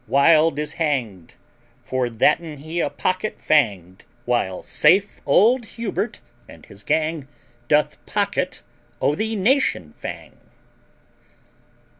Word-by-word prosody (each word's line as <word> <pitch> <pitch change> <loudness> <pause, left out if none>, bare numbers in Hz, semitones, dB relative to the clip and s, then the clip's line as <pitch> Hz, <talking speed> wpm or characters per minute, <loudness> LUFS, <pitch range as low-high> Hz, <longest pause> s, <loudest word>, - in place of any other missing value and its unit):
Wild 155 +4 +4
is 150 0 -3
hang'd, 120 - -2 0.5
For 130 -1 -1
thatten 150 +7 +1
he 160 +4 -5
a 155 - 0
pocket 185 +9 -2
fang'd, 100 - +1 0.2
While 110 -7 -1
safe 195 +3 +2
old 240 +3 +4
Hubert, 225 -1 -3 0.3
and 80 - -14
his 100 - -15
gang, 155 +2 -1 0.4
Doth 150 +1 +1
pocket - - -2 0.4
o' 145 - +2
the 220 +6 -2
nation 250 +8 +1
fang. - - -8
150 Hz, 110 wpm, -22 LUFS, 125-185 Hz, 0.5 s, Wild